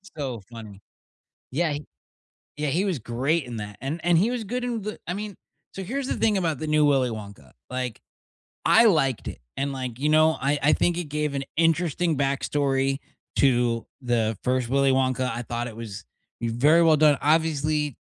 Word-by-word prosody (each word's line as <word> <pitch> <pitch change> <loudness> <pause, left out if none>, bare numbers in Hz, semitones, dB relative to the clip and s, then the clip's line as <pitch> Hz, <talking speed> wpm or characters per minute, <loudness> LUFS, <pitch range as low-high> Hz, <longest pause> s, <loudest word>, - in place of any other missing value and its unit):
So 130 -7 -4
funny. 110 -4 -10 0.7
Yeah, 150 +1 0 0.8
yeah, 150 -1 -1
he 175 +8 +1
was 185 -7 -1
great 135 +8 0
in 120 -2 -6
that, 105 -1 -7
and 145 +6 -3
and 175 -1 +4
he 200 +8 +3
was 245 -2 -2
good 245 +4 -3
in 240 -2 -2
the 215 +1 -5
I 175 - -2
mean, 205 0 -5 0.4
so 195 - -5
here's 260 +8 -3
the - - -1
thing 215 -3 +2
about 165 -6 -1
the 155 - -3
new 150 -1 +3
Willy 135 -3 +3
Wonka, 100 - -9 0.2
like, 125 -3 -4 0.6
I 235 - +6
liked 145 - +2
it, - - -7 0.2
and, 140 +1 -1
like, 130 -3 -5
you 145 +3 0
know, 155 +1 +4
I 140 +2 +1
I 150 - +4
think 175 -1 +2
it 175 - -2
gave 150 -1 -2
an 140 - -1
interesting 165 0 +2
backstory 135 0 0 0.4
to 120 -3 +2 0.2
the 115 -3 0
1st 125 -1 +1
Willy 135 0 +3
Wonka, 130 -1 +1
I 120 +1 -4
thought 120 0 -3
it 110 - -10
was 110 -3 -7 0.4
very 130 +9 +4
well 160 -2 +5
done. 150 -2 +5
Obviously, 150 -2 +1
140 Hz, 185 wpm, -25 LUFS, 125-165 Hz, 0.8 s, I